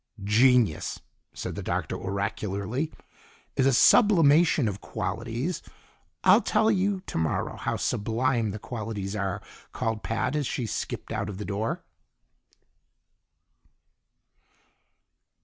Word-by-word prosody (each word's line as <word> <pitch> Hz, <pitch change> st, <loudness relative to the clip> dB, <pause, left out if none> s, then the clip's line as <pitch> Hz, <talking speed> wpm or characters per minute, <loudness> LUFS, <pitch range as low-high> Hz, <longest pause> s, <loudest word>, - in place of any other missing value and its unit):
"Genius," 115 Hz, -3 st, +3 dB, 0.3 s
said -, -, -5 dB
the -, -, -5 dB
Doctor -, -, -2 dB
oracularly, 100 Hz, +6 st, -2 dB, 0.6 s
"is 135 Hz, -1 st, +3 dB
a -, -, +5 dB
sublimation 165 Hz, -, +5 dB
of 100 Hz, -1 st, -4 dB
qualities 115 Hz, -, -3 dB, 0.3 s
" 85 Hz, +1 st, -40 dB
"I'll 225 Hz, -, +7 dB
tell 220 Hz, +1 st, +2 dB
you 195 Hz, -1 st, 0 dB
tomorrow 80 Hz, 0 st, -1 dB
how -, -, -2 dB
sublime 115 Hz, +1 st, 0 dB
the 100 Hz, -, -4 dB
qualities 105 Hz, -3 st, -5 dB
are," 100 Hz, -3 st, -2 dB, 0.3 s
called 110 Hz, -1 st, -2 dB
Pat 115 Hz, +5 st, -1 dB
as 145 Hz, -4 st, 0 dB
she 125 Hz, -, -2 dB
skipped -, -, -4 dB
out 105 Hz, -2 st, -2 dB
of 100 Hz, -, -6 dB
the 105 Hz, -, -5 dB
door. 105 Hz, +3 st, -2 dB
115 Hz, 115 wpm, -27 LUFS, 100-140 Hz, 0.6 s, I'll